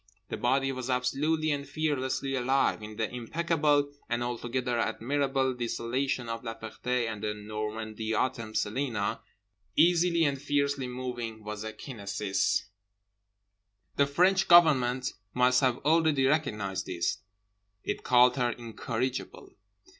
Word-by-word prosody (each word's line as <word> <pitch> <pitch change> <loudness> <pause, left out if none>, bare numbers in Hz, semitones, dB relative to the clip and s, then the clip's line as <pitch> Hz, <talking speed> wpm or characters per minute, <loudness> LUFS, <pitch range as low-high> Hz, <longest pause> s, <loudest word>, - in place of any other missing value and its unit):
The - - -3
body 135 +2 +1
was 130 -1 -5
absolutely 150 +5 +1
and 140 -1 -1
fearlessly 140 -3 -1
alive. 130 -1 +1
In 105 0 -8
the 110 0 -1
impeccable 145 +2 +1 0.2
and 120 0 0
altogether 120 0 -2
admirable 135 +3 0
desolation 125 +1 -2
of 115 +1 -4
La 115 -1 -4
Ferté 120 +2 -2
and 110 -2 -5
the 105 -1 -2
Normandy 110 +1 -4
Autumn 115 -2 -1
Celina, 110 -2 -1 0.5
easily 170 0 +4
and 140 -3 0
fiercely 140 -2 0
moving, 120 -3 -5
was 105 0 -5
a 110 - -4
kinesis. 100 -4 -1 1.3
The 140 - +3
French 185 +6 +3
Government 135 -7 +5 0.2
must 125 +1 +4
have 130 -2 +2
already 155 -3 +3
recognized 105 -10 0
this; 85 -2 -1 0.6
it - - -3
called 125 +1 +5
her 120 -1 +2
incorrigible. 120 +2 -4
125 Hz, 125 wpm, -29 LUFS, 115-140 Hz, 1.3 s, Government